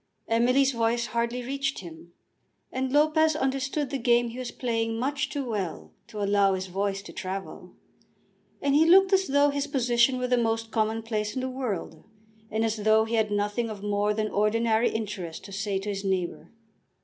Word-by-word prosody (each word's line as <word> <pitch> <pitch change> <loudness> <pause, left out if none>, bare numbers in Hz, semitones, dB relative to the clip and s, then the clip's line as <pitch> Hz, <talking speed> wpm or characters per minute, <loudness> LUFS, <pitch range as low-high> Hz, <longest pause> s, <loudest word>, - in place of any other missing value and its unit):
Emily's 250 +4 +3
voice 235 0 0
hardly 235 +2 -2
reached 275 +2 -2
him, 170 -1 -12 0.6
and 260 0 -2
Lopez 310 +2 +3
understood 270 0 -1
the 275 - -2
game 240 0 +3
he 240 +2 -8
was 255 - -4
playing 225 -2 -2
much 275 +4 -1
too 280 -3 -4
well 175 - -4
to 210 -1 -5
allow 200 -1 +3
his 185 0 -4
voice 195 +1 -2
to - - -11
travel. 190 0 -6 0.9
And 280 0 +2
he 310 +3 +5
looked 385 +2 +6
as 380 -1 +3
though 285 +1 +3
his 285 0 -2
position 250 -2 +2
were 250 - -1
the 250 0 +2
most 225 -1 -1
commonplace 220 0 -1
in 260 - -1
the 260 - -2
world, 210 -11 -4 0.5
and 220 +1 0
as 220 0 -1
though 215 +1 +3
he 225 - -5
had 220 -2 +2
nothing 205 +3 -1
of 205 -2 -7
more 205 0 0
than 215 0 -1
ordinary 220 +2 +2
interest 200 -7 -5
to 200 - -10
say 200 0 -2
to 195 +2 -4
his 200 -1 -3
neighbour. 185 -3 -2
225 Hz, 185 wpm, -27 LUFS, 205-260 Hz, 0.9 s, looked